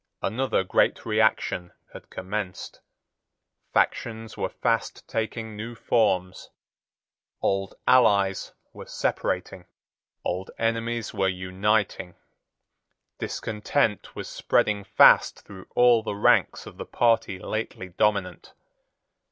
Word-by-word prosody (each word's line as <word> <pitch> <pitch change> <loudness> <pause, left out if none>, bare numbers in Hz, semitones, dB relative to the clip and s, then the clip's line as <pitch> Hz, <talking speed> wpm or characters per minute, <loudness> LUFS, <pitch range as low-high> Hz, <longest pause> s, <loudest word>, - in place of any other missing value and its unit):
Another 130 -4 0
great 95 - +1
reaction 110 -5 +1 0.2
had - - -12
commenced. 95 -1 -5 0.9
Factions 110 -1 -1
were - - -2
fast - - -2
taking 110 0 -4
new 115 +3 -6
forms. 95 -6 0 0.9
Old 95 0 -1
allies 100 -6 +3 0.2
were - - -10
separating. - - -2 0.6
Old 90 +2 -3
enemies 115 0 -1
were 95 -2 +1
uniting. 95 +1 -1 1.0
Discontent 110 0 -1
was - - -6
spreading 100 -1 +1
fast 100 - +5
through 95 -2 -12
all 120 -2 +5
the 110 -2 -4
ranks 100 - +2
of - - -12
the - - -6
party 115 -5 +1
lately 95 -1 -5
dominant. 95 0 -1
105 Hz, 100 wpm, -25 LUFS, 95-115 Hz, 1.0 s, fast